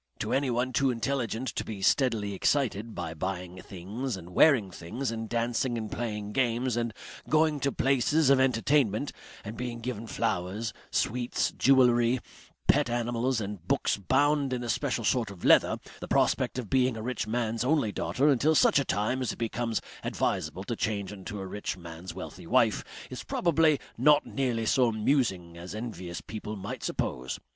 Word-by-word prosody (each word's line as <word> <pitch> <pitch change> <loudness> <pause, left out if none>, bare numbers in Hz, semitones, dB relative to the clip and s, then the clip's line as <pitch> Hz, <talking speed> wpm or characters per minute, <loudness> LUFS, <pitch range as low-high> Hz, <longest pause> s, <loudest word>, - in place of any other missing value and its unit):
To - - -2
anyone 130 -2 0
too 135 +2 +3
intelligent 125 0 -1
to - - -3
be 100 -3 -6
steadily 110 -4 +2
excited 115 0 0
by 80 - -4
buying 90 +2 -4
things 100 +6 -5
and 90 0 -11
wearing 110 - +5
things 110 +10 -4
and 115 -1 -5
dancing 120 +1 0
and 110 -2 -5
playing 105 -3 -3
games 120 0 +1
and 120 -1 -1 0.4
going 155 -1 +3
to 140 +1 0
places 135 +3 +3
of 135 - +5
entertainment, 130 -1 +2 0.3
and 105 +2 -6
being 120 -1 -4
given 115 -1 -5
flowers, 100 +4 -2 0.2
sweets, 120 +1 0
jewellery, 125 -2 +4 0.5
pet - - +4
animals, 120 +1 0
and 100 -4 -6
books - - +2
bound 140 +6 +2
in 125 -1 -2
a 120 - -4
special 120 +1 0
sort 115 0 +1
of 95 -3 -9
leather, - - +5 0.2
the - - -7
prospect - - +1
of 125 -4 -3
being 130 0 +2
a 110 - -5
rich 125 -2 -2
man's 115 0 -1
only 140 -5 +2
daughter 135 +7 0
until 150 +3 +4
such 140 - +5
time 110 +6 0
as 125 - -1
it - - -12
becomes 115 0 -1 0.2
advisable 95 - -1
to 115 - -3
change 100 -3 -2
into 100 0 -7
a 95 - -5
rich 100 0 -4
man's 85 +1 -8
wealthy - - -8
wife, - - +3 0.3
is - - -6
probably 160 -4 +2 0.2
not 145 +3 +5
nearly 125 -4 -1
so 125 +2 +4
amusing 110 -7 0
as 90 +4 -7
envious 100 -6 -6
people 110 0 -6
might 100 +1 -6
suppose. 65 +1 -3
115 Hz, 170 wpm, -29 LUFS, 105-130 Hz, 0.5 s, wearing